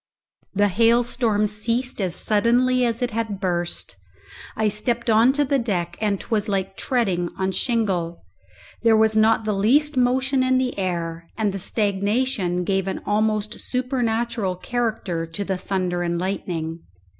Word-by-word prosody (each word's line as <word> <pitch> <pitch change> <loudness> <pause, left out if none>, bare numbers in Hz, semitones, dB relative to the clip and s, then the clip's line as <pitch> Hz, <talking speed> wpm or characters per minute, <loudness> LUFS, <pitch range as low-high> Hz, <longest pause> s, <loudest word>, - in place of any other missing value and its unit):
The 205 +1 +4
hailstorm 230 0 +2
ceased 230 +4 -1
as 180 -2 -1
suddenly 245 +5 +2
as 230 +2 -2
it 245 - -1
had 220 -3 -3
burst. 175 - -2 0.6
I 220 -1 +1
stepped 235 +3 0
on 225 +4 +5
to 290 +1 +2
the 275 0 +1
deck, 190 -8 -2
and 205 -3 0
'twas 215 -3 -1
like 195 -1 -1
treading 195 -10 0
on 190 0 0
shingle. 190 -6 -1 0.6
There 225 -1 +5
was 220 0 +3
not 220 0 +3
the 215 - 0
least 270 +10 +2
motion 260 +2 +2
in 255 0 +3
the 255 -1 -1
air, 170 -2 -3
and 210 -3 0
the 195 - -4
stagnation 200 -1 0
gave 195 +1 0
an 190 - -3
almost 215 0 0
supernatural 235 -5 -1
character 205 -6 -2
to 180 +5 -5
the 190 - -1
thunder 180 -1 -2
and 170 0 -1
lightning. 170 -3 -3
215 Hz, 150 wpm, -23 LUFS, 190-240 Hz, 0.6 s, on